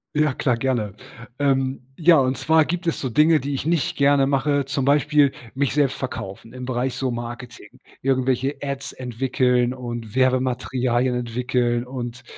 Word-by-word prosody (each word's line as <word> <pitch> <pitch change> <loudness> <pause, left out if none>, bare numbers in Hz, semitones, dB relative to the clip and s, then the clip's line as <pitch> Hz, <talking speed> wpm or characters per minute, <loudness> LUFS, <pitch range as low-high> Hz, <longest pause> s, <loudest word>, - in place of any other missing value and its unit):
Ja 150 -3 +2
klar 125 -3 0
gerne. 115 -6 -1 0.4
Ähm, 135 -2 +1
ja 165 0 +5
und 130 0 +1
zwar 155 +4 +3
gibt 175 +2 -3
es 165 - 0
so 130 - -2
Dinge, 155 +5 +4
die 140 +1 -4
ich 140 +2 -3
nicht 165 -3 0
gerne 140 -1 +4
mache 140 +1 +1
zum 135 0 -2
Beispiel 145 0 +3 0.2
mich 135 0 -1
selbst 145 -3 +2
verkaufen 115 -4 -6
im 125 0 -7
Bereich 125 0 -2
so 130 -2 -1
Marketing 120 -1 -8 0.2
irgendwelche 130 +1 0
Ads 140 0 -4
entwickeln 125 0 0
und 120 -3 -6
Werbematerialien 130 -1 +1
entwickeln 125 0 -1
und 120 -2 -6
130 Hz, 155 wpm, -22 LUFS, 125-140 Hz, 0.4 s, ja